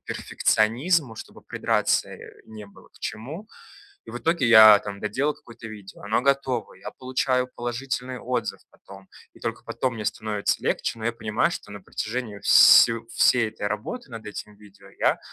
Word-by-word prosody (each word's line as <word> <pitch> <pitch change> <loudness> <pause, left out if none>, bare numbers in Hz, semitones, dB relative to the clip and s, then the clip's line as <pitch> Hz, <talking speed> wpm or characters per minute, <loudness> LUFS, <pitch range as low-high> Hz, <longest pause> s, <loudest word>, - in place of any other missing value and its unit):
перфекционизму, 125 +5 0
чтобы - - -11
придраться, - - 0
э, - - -12
не 110 -1 -10
было 100 - -19
к - - -23
чему. 150 - -7 0.6
И - - -12
в 120 - -5
итоге 165 -2 0
я 110 -2 +9
там 100 -1 -8
доделал 140 +8 -1
какое-то 115 -6 -13
видео, 105 -3 -12
оно 105 +3 0
готово. 135 -3 0
Я 95 - -10
получаю 130 0 -1
положительный 125 +1 -4
отзыв 125 -2 -3
потом. 95 0 -16 0.3
И - - -19
только - - -5
потом 130 -2 -3
мне 110 -2 -6
становится 105 0 -2
легче, 115 - -2
но 110 - -6
я 115 - 0
понимаю, 110 +4 0
что 105 - -8
на 105 - -8
протяжении 110 +2 -5
все 115 +3 +7
всей 120 -3 +3
этой 105 -1 -5
работы 120 - -6
над 115 -1 -9
этим 105 0 -8
видео 105 -2 -18
я - - +2
115 Hz, 170 wpm, -24 LUFS, 105-130 Hz, 0.6 s, я